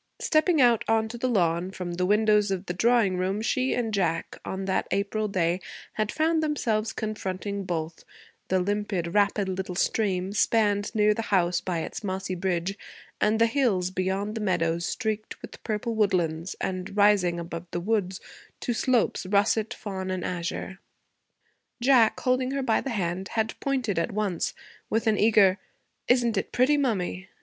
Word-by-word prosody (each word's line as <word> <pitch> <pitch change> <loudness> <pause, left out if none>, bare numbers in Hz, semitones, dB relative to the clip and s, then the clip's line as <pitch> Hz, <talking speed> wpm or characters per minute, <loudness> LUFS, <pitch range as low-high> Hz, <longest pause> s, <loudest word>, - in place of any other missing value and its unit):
Stepping 315 +1 +2
out 240 -4 +5
on 225 0 +2
to 230 - -8
the 255 +2 -1
lawn 175 -4 +1
from 180 -2 -5
the 180 +1 0
windows 210 0 +3
of 190 0 -2
the 180 - -3
drawing 220 -1 +3
room, 190 +3 -1
she 255 +4 0
and 225 -3 -2
Jack, 165 -4 -1
on 190 0 -4
that 190 -1 0
April 200 +2 -1
day, 180 -2 0 0.3
had 215 -1 -1
found 320 +1 +1
themselves 230 -8 0
confronting 200 -2 -4
both 165 -2 -4 0.4
the 185 - +2
limpid, 195 -3 -2
rapid 205 -1 +2
little 185 -1 -3
stream, 190 -1 0
spanned 205 -2 +2
near 210 0 +4
the 225 - -3
house 180 -3 +2
by 175 -3 -2
its - - -6
mossy 190 -1 -3
bridge, 185 +1 -2 0.4
and 215 +1 +3
the 230 - +6
hills, 225 -8 +1
beyond 190 +3 -1
the 225 - -4
meadows, 170 -3 0
streaked 220 -3 -3
with - - -11
purple 225 +1 -2
woodlands 180 -5 0
and 190 +2 -4
rising, 200 -4 +4
above 170 0 -6
the 175 - -3
woods, 190 -1 -1 0.4
to 240 - -2
slopes 240 -5 +1
russet, 210 +3 +2
fawn, 190 -5 -5
and 185 -2 -2
azure. 180 +2 -4 1.0
Jack, 240 -3 +4
holding 255 0 +1
her 275 0 -2
by 225 -4 +2
the 275 - -4
hand, 190 -4 -2
had 220 0 0
pointed 255 -10 -1
at - - -1
once 200 -4 -1 0.3
with 225 +2 0
an 215 -2 +2
eager 205 -3 +5 0.5
'Isn't 240 -3 +3
it - - -2
pretty, 260 +4 +3
mummy!' 190 -9 -1
200 Hz, 165 wpm, -26 LUFS, 185-225 Hz, 1.0 s, the